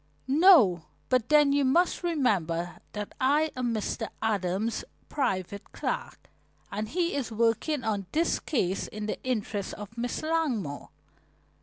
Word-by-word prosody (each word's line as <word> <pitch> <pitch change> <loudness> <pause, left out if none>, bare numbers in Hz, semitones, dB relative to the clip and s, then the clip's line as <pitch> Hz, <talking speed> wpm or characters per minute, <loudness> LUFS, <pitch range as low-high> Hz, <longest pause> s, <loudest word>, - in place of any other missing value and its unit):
"No, 265 - +6 0.2
but 255 -3 +1
then 295 -2 +5
you 285 0 +3
must 335 +7 +2
remember 185 - 0
that 210 -1 -5
I 295 +4 +3
am 250 -2 -1
Mr. 220 0 -2
Adams' 210 +1 -1 0.3
private 200 - -2
clerk, - - -4 0.4
and 210 +1 -3
he 350 +3 0
is 260 -5 -2
working 230 +6 +1
on 205 -4 -2
this 330 +2 +1
case 195 - -1
in 210 0 -6
the 215 - -4
interests 215 -5 -2
of 210 +1 -9
Miss 245 +4 -3
Langmore." 275 - -1
230 Hz, 135 wpm, -28 LUFS, 200-290 Hz, 0.4 s, No